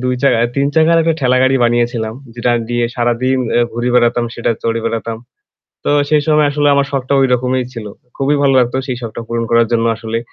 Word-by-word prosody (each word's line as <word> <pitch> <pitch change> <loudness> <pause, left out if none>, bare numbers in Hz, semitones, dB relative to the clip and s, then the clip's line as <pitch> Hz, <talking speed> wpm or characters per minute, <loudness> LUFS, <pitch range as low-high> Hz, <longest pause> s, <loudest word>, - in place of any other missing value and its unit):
২ 125 0 +1
চাকার 120 -4 +3
৩ 140 0 +2
চাকার 160 +1 +4
একটা 165 0 +1
ঠেলাগাড়ি 130 0 +3
বানিয়েছিলাম। 120 -2 0 0.2
যেটা 120 0 -1 0.2
দিয়ে 120 0 0
সারাদিন 120 +2 0 0.2
এ্যা 120 - +3
ঘুরে 120 +2 -2
বেড়াতাম, 120 0 +2
সেটা 120 - -1
চড়ে 115 0 -1
বেড়াতাম। 115 0 -3 0.7
তো - - 0 0.2
সেই 150 -1 +2
সময় 150 -1 +3
আসলে 145 0 +1
আমার 140 0 +2
শখটা 135 -1 -2
ঐরকমই 130 -1 +1
ছিল। 115 -3 -7 0.3
খুবই 140 +2 +1
ভালো 135 -1 +3
লাগতো 125 0 +1
সেই 130 -3 -3
শখটা 115 0 -6
পূরণ 115 0 -2
করার 115 0 +4
জন্য 115 -1 +1
আসলে। 110 0 -4
125 Hz, 190 wpm, -15 LUFS, 115-135 Hz, 0.7 s, চাকার